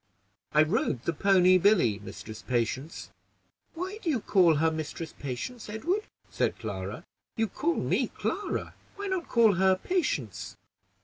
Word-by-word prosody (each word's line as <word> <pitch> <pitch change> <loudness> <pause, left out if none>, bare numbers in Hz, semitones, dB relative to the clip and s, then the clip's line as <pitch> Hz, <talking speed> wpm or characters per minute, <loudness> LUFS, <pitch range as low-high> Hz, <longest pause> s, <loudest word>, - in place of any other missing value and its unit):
"I 150 +1 +6
rode 155 - 0
the 170 - 0
pony 185 +2 +5
Billy, 170 - +4
Mistress 110 +1 -9
Patience." 125 +5 -2 0.6
"Why 375 +5 -4
do 340 - -2
you 270 -6 +2
call 180 -6 +4
her 160 +2 +2
Mistress 160 +1 -5
Patience, 145 - -6
Edward?" 350 - -1 0.2
said - - 0
Clara. 100 -2 -5 0.3
"You 225 - +1
call 325 - -1
me - - +1
Clara; 410 - -3 0.2
why 405 - -5
not 380 -3 -2
call 230 -3 +5
her 190 0 +4
Patience?" 145 - -2
180 Hz, 140 wpm, -28 LUFS, -, 0.6 s, I